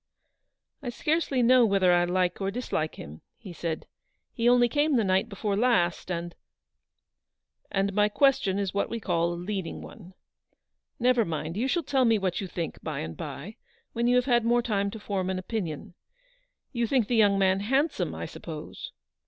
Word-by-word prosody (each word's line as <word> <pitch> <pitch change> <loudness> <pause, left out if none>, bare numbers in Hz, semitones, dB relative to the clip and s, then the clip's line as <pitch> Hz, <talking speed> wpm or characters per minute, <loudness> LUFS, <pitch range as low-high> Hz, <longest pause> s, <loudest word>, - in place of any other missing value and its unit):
"I 255 - -4
scarcely 290 -1 0
know 250 +1 +6
whether 195 -4 +4
I 175 0 +4
like 180 +1 0
or 195 - 0
dislike 195 -8 -3
him," 75 +2 -10 0.2
she 195 -6 -9
said; 165 -1 -4 0.5
"he 235 -1 +2
only 245 0 +5
came 290 +4 +1
the 230 - +3
night 190 +3 +1
before 200 0 -2
last, 210 -8 +1
and 170 -1 -3 0.4
— - - -56
" - - -60
" - - -58
And 195 0 0
my 210 +1 +3
question 270 -5 +2
is 200 -2 -2
what 200 - 0
we 230 - -3
call 170 -4 0
a - - -3
leading 185 0 -4
one. 185 -3 -13 0.8
Never 245 -1 +3
mind, 160 -2 -4
you 235 +6 0
shall 335 +5 0
tell 270 -2 +2
me 225 -2 +4
what 190 -2 -1
you 195 - -4
think 170 -2 -5
by - - -4
and 80 0 -6
by, 185 +10 -7 0.4
when 235 +1 0
you 245 - +4
have 250 0 +3
had 240 -3 +3
more 240 +1 +2
time 200 -4 0
to 220 +2 -8
form 195 -3 -2
an 190 - -1
opinion. 185 -2 -4 0.8
You 235 -3 -1
think 245 -3 +2
the 245 - 0
young 205 -3 +4
man 190 0 +3
handsome, 270 +10 0
I - - -5
suppose - - -8
205 Hz, 195 wpm, -27 LUFS, 185-240 Hz, 0.8 s, know